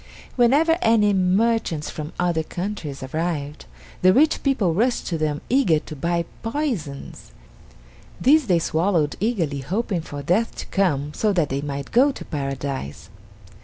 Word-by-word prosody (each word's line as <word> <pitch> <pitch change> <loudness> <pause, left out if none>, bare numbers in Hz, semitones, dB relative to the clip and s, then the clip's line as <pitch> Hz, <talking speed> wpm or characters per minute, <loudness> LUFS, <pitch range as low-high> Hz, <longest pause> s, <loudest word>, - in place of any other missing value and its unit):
Whenever 295 +7 +4
any 215 -3 +4
merchants 190 -3 +1
from 150 0 -6
other 175 -2 +1
countries 170 -5 -5
arrived, 150 0 -3 0.4
the 185 - +6
rich 305 +9 +3
people 230 - +1
rushed 235 +8 +1
to 170 - -2
them 155 -2 -1
eager 240 - +3
to 155 - -7
buy 170 +3 -1 0.2
poisons. 225 - -4 0.9
These 290 +1 +4
they 180 -3 +4
swallowed 165 -1 +1
eagerly 175 -10 -1
hoping 185 - -2
for 145 -3 -7
death 190 +10 +1
to - - -6
come 150 -7 +1
so 215 - +1
that 170 -6 +1
they 135 +1 -2
might 140 -1 -5
go 270 +4 +5
to - - -9
Paradise. 135 - -5
175 Hz, 145 wpm, -23 LUFS, 150-225 Hz, 0.9 s, the